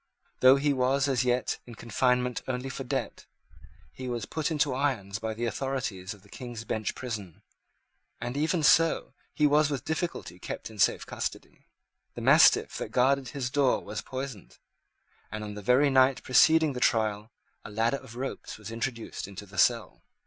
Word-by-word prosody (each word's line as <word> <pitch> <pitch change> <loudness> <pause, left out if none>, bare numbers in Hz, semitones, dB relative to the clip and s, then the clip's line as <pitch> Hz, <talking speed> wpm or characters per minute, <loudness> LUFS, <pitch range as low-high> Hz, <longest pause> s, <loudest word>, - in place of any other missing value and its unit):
Though 130 +1 +7
he 145 +1 +1
was 135 +1 +1
as 130 -3 +1
yet 125 0 0
in 120 - -10
confinement 125 +2 0
only 130 +1 -3
for 135 - -5
debt, 130 -2 -4 0.7
he 130 - -7
was 120 -4 -3
put 155 +6 -2
into 150 -4 +1
irons 120 -7 -1
by 110 0 -3
the 120 +2 -2
authorities 115 -7 -3
of 100 - -21
the - - -19
King's 120 0 -8
Bench 110 -2 -3
prison; 105 -9 -6 0.8
and 120 +2 -4
even 155 +3 0
so 165 +2 +4 0.2
he 150 - +3
was 150 +1 +4
with 140 -3 -4
difficulty 160 - -3
kept 110 - -6
in 110 - -13
safe - - +3
custody. - - -6 0.5
The - - -6
mastiff - - +5
that - - -4
guarded 135 +1 +2
his 125 -1 -4
door 140 -3 +2
was 105 +1 -5
poisoned; 130 -6 -7 0.7
and, 105 0 -5
on 105 -1 -6
the 105 - -7
very 130 +7 +4
night 130 0 +4
preceding 160 +4 +5
the 125 - -4
trial, 110 -2 +1 0.3
a - - -9
ladder 115 +5 0
of 115 - -13
ropes 130 +2 -5
was 110 +1 -9
introduced 115 -3 -4
into 100 +1 -9
the 95 -1 -7
cell. - - +2
125 Hz, 175 wpm, -28 LUFS, 110-135 Hz, 0.8 s, Though